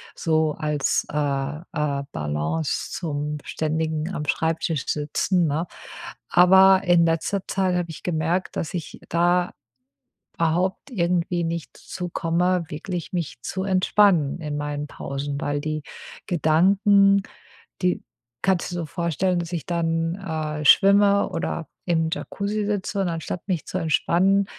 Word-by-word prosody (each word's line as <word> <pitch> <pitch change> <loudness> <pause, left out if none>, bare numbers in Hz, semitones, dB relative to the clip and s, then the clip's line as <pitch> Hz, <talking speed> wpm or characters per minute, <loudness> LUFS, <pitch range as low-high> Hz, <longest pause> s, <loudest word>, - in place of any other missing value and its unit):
so 160 -1 +1
als, 150 -2 0
äh, - - -7
äh, 145 0 -2
Balance 75 +1 -2
zum 150 -2 -3
ständigen 160 +2 -2
Am-Schreibtisch-Sitzen, 160 +2 0
ne? 155 +4 -1 0.6
Aber 190 +2 +6
in 175 -2 +5
letzter 165 +4 0
Zeit 190 -2 0
habe 175 -1 -1
ich 160 - -10
gemerkt, 170 +2 -1
dass 165 - -3
ich 170 -4 -6
da 175 +1 +2 0.8
überhaupt 175 - 0
irgendwie 175 -4 0
nicht 165 0 -4
zu 180 -1 -6
komme, 175 +2 +1
wirklich 170 +3 -5
mich 170 -8 -3
zu 190 -1 -3
entspannen 185 -5 +3
in 150 -2 -4
meinen 145 0 -3
Pausen, 140 0 -4
weil 145 -2 -1
die 155 0 -3 0.4
Gedanken, 195 +5 +4 0.6
die 180 0 +1 0.4
kannst 190 -3 +1
dir - - -3
so 170 -2 -3
vorstellen, 175 +2 0
dass 170 0 -6
ich 170 -3 -3
dann, 165 -1 0
äh, 155 -5 -4
schwimme 200 +5 +6
oder 165 -2 -3 0.2
im 165 -2 +1
Jacuzzi 205 +3 -2
sitze 200 -1 -2
und 190 - +1
anstatt 165 +1 -4
mich 180 -5 -1
zu 185 - -3
entspannen, 185 +4 +2
170 Hz, 130 wpm, -24 LUFS, 155-185 Hz, 0.8 s, Aber